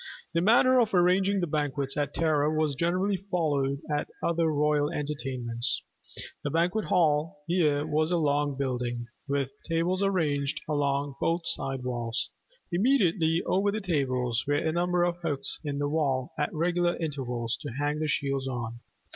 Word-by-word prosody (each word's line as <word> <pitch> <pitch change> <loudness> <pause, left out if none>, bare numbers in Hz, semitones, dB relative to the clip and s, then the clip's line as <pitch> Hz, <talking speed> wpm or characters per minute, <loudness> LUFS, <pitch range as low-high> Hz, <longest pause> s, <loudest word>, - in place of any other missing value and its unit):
The 165 - +2
manner 250 +6 +5
of 220 -4 +2
arranging 190 +2 +3
the - - +1
banquets 145 -3 -1
at 145 -1 -1
Tara 155 -2 +2
was 155 -2 +1
generally 185 +6 +1
followed 145 -6 0
at 150 -1 -1 0.2
other 170 -1 +2
royal 150 -1 +2
entertainments. 135 -5 -2 0.6
The 145 - -1
Banquet 175 +7 +1
hall 165 +1 +1
here 155 -4 +2
was 155 +1 +1
a 175 - +2
long 145 -2 +1
building, 125 -3 -2 0.2
with 140 -1 -1 0.2
tables 170 +3 +1
arranged 150 -8 +1
along 140 -2 0
both 170 +1 +1
side 135 -1 -1
walls. 120 -1 -2 0.4
Immediately 175 -6 +2
over 200 +2 +2
the 215 - -2
tables 130 - 0
were 145 - +2
a 160 +2 +1
number 175 +1 +1
of 175 0 0
hooks 160 -5 -1
in 145 -2 -3
the 145 0 0
wall 140 -4 0
at 150 - -1
regular 175 +2 +1
intervals 125 -7 -2
to 145 - -5
hang 145 +3 -1
the 155 - 0
shields 135 -2 -1
on. 120 -2 -4
150 Hz, 155 wpm, -28 LUFS, 140-175 Hz, 0.6 s, manner